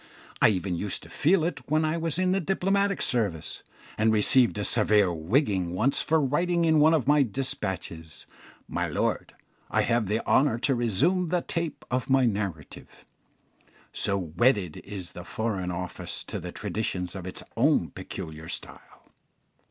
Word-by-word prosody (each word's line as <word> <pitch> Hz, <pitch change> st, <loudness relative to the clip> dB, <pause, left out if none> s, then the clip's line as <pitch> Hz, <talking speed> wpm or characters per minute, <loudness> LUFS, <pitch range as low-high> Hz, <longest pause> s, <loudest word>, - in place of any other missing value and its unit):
I -, -, +8 dB
even 95 Hz, -2 st, -1 dB
used 100 Hz, +3 st, -2 dB
to -, -, -13 dB
feel 165 Hz, +2 st, +3 dB
it 170 Hz, -2 st, -4 dB
when 155 Hz, +1 st, +2 dB
I 155 Hz, +1 st, 0 dB
was 165 Hz, -1 st, -2 dB
in 185 Hz, 0 st, +2 dB
the 195 Hz, -, +2 dB
diplomatic 195 Hz, +3 st, +1 dB
service, 100 Hz, -10 st, -1 dB, 0.4 s
and 110 Hz, +1 st, +4 dB
received 110 Hz, +2 st, +4 dB
a 105 Hz, -, -2 dB
severe 105 Hz, -4 st, +3 dB
"wigging" 90 Hz, -, 0 dB
once 125 Hz, +9 st, +2 dB
for 160 Hz, 0 st, +2 dB
writing 170 Hz, +5 st, +1 dB
in 160 Hz, -1 st, +4 dB
one 155 Hz, +2 st, +5 dB
of 150 Hz, -, 0 dB
my 145 Hz, 0 st, +5 dB
despatches, 95 Hz, -, -4 dB, 0.4 s
"My -, -, -2 dB
lord, -, -, -2 dB, 0.3 s
I -, -, +2 dB
have 115 Hz, -2 st, +1 dB
the 110 Hz, +3 st, -1 dB
honour 130 Hz, -4 st, +3 dB
to 135 Hz, +3 st, +1 dB
resume 135 Hz, -, +1 dB
the 175 Hz, +1 st, 0 dB
'tape' 170 Hz, -2 st, -3 dB
of 125 Hz, +1 st, -1 dB
my 135 Hz, -1 st, +4 dB
narrative" 100 Hz, -, -4 dB, 0.9 s
so 100 Hz, -1 st, 0 dB
wedded 90 Hz, -, +1 dB
is 95 Hz, -4 st, -8 dB
the 90 Hz, -, -9 dB
Foreign 100 Hz, -2 st, -3 dB
Office 90 Hz, 0 st, -5 dB
to -, -, -5 dB
the -, -, -7 dB
traditions 90 Hz, -5 st, -3 dB
of 95 Hz, -1 st, -6 dB
its 90 Hz, -, -6 dB
own 115 Hz, -, +2 dB
peculiar 80 Hz, +1 st, -8 dB
style. -, -, -8 dB
115 Hz, 160 wpm, -27 LUFS, 95-155 Hz, 0.9 s, I